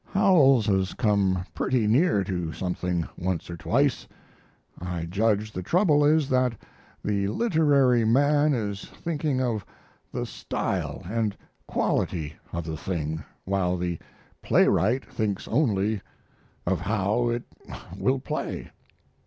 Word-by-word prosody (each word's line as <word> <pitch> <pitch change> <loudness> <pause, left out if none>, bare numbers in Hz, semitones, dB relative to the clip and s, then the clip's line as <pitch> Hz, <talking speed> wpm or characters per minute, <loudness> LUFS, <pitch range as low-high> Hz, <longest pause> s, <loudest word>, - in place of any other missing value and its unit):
Howells 155 - +5
has 95 -2 +1
come 100 -5 +1
pretty 120 +7 +1
near 115 - +3
to 90 -4 -3
something 90 -2 -2
once 90 -1 -2
or - - -4
twice. 85 - +1 0.7
I 90 -2 -4
judge 105 +4 0
the 90 - -4
trouble 155 - +3
is 150 -1 +4
that 125 -2 +2 0.5
the 100 -1 0
literary 140 - +3
man 145 +5 +3
is 100 -4 -3
thinking 150 -5 -2
of 115 -5 -1 0.5
the - - -3
style - - -3
and 110 +1 -1 0.3
quality 80 -4 -1 0.2
of 85 - -3
the 80 0 -5
thing, 80 -2 -3 0.2
while 95 -2 0
the 85 -1 -2 0.4
playwright 120 +7 +3
thinks 110 -6 -3
only 110 -6 +1 0.6
of - - +1
how 105 +3 0
it 120 0 -1 0.5
will 130 +1 +1
play. 130 - -4
105 Hz, 120 wpm, -26 LUFS, 95-130 Hz, 0.7 s, Howells